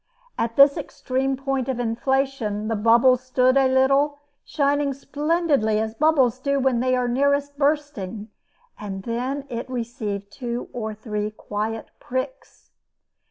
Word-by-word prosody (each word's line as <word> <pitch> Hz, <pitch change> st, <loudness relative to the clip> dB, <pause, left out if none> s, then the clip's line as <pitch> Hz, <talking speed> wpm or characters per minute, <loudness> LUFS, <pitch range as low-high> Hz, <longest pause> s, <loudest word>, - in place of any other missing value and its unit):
At 230 Hz, 0 st, -2 dB
this 280 Hz, 0 st, +7 dB
extreme 265 Hz, +1 st, -2 dB
point 270 Hz, -1 st, -2 dB
of 255 Hz, -2 st, -2 dB
inflation, 235 Hz, -2 st, -1 dB
the 225 Hz, -, 0 dB
bubble 235 Hz, +4 st, +5 dB
stood 255 Hz, 0 st, +2 dB
a 270 Hz, -1 st, +5 dB
little, 275 Hz, +2 st, +3 dB, 0.3 s
shining 285 Hz, -1 st, 0 dB
splendidly 290 Hz, -6 st, 0 dB
as 220 Hz, 0 st, -2 dB
bubbles 265 Hz, -3 st, +3 dB
do 280 Hz, +1 st, 0 dB
when 260 Hz, -3 st, +2 dB
they 255 Hz, +1 st, +2 dB
are 250 Hz, -1 st, 0 dB
nearest 280 Hz, +3 st, +1 dB
bursting, 280 Hz, -8 st, -1 dB, 0.5 s
and 195 Hz, -2 st, -6 dB
then 255 Hz, +5 st, -3 dB
it 240 Hz, -1 st, -5 dB
received 225 Hz, -5 st, -4 dB
two 240 Hz, 0 st, -5 dB
or 220 Hz, -3 st, -4 dB
three 210 Hz, -1 st, -3 dB
quiet 215 Hz, +1 st, -5 dB
pricks. 470 Hz, -, -6 dB
255 Hz, 135 wpm, -23 LUFS, 225-275 Hz, 0.5 s, this